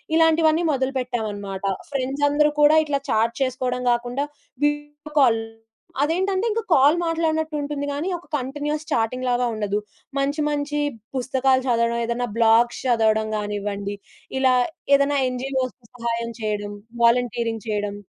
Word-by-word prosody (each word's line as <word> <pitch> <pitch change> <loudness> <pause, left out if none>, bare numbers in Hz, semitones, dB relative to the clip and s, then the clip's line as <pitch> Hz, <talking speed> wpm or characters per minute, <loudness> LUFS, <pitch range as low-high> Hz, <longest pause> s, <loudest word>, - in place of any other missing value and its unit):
ఇలాంటివన్నీ 325 0 +4
మొదలుపెట్టామన్నమాట. 235 -7 -3 0.3
ఫ్రెండ్సందరూ 290 +2 +2
కూడా 295 +2 +7
ఇట్లా 280 -2 -1
చాట్ 225 +2 +2
చేసుకోవడం 250 -1 -2
గాకుండా, 245 +4 -1 0.4
వీడియో 295 +1 -3
కాల్. 235 -4 +5 0.6
అదేంటంటే, 375 +6 0
ఇంక 455 +2 0
కాల్ 285 +2 +6
మాట్లాడినట్టు 320 -2 0
ఉంటుంది 285 0 -3
గానీ, 290 +6 -3
ఒక 345 - -16
కంటిన్యూస్ 295 +4 -3
చాటింగ్‌లాగా 245 +1 +1
ఉండదు. 205 -2 -1 0.4
మంచి 285 +2 0
మంచి 295 0 -1 0.4
పుస్తకాలు 260 0 +2
చదవడం, 235 -1 +2
ఏదైనా 240 +1 -1
బ్లాగ్స్ 230 +1 +4
చదవడం 220 -2 +2
గానివ్వండి, 205 -1 -3 0.4
ఇలా 260 -1 +4 0.4
ఏదైనా 280 0 +2
ఎన్‌జీఓస్ 255 0 -2 0.2
సహాయం 235 -1 -2
చేయడం, 205 -1 -2 0.3
వాలంటీరింగ్ 235 -1 +1
చేయడం. 205 -1 -2
255 Hz, 115 wpm, -23 LUFS, 230-295 Hz, 0.6 s, కూడా